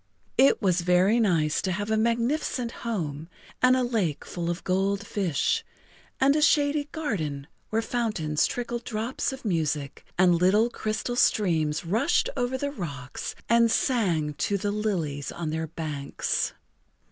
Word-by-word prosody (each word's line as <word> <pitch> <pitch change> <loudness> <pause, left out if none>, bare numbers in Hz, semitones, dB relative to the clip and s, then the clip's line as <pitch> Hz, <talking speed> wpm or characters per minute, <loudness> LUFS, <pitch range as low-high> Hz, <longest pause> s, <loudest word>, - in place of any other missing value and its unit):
It 270 -3 +5
was 185 -2 +3
very 180 +6 +3
nice 165 -8 +2
to 190 - -1
have 205 +4 -2
a - - +3
magnificent 235 +2 0
home, 165 -11 -4 0.3
and 255 0 +6
a 255 - +1
lake 215 - -1
full 170 -1 -4
of 175 +2 -3
gold 195 +2 0
fish, 180 -9 0 0.6
and 275 +2 +4
a 305 - +2
shady 290 -1 +3
garden 160 - -3 0.2
where 225 +1 0
fountains 210 -12 0
trickled 240 -1 -4
drops 230 +4 -2
of 265 -2 -9
music, 155 -7 -1
and 180 -1 +5
little 195 +7 +3
crystal 220 +3 -3
streams 165 -10 +2
rushed 230 - +2
over 250 0 -1
the 285 +2 -2
rocks 145 - -6
and 235 0 +5
sang 180 - +1
to 200 - +1
the 205 +1 -1
lilies 175 -10 -2
on 165 -3 -4
their 160 +1 -2
banks. 150 -3 -2
200 Hz, 145 wpm, -26 LUFS, 160-235 Hz, 0.6 s, and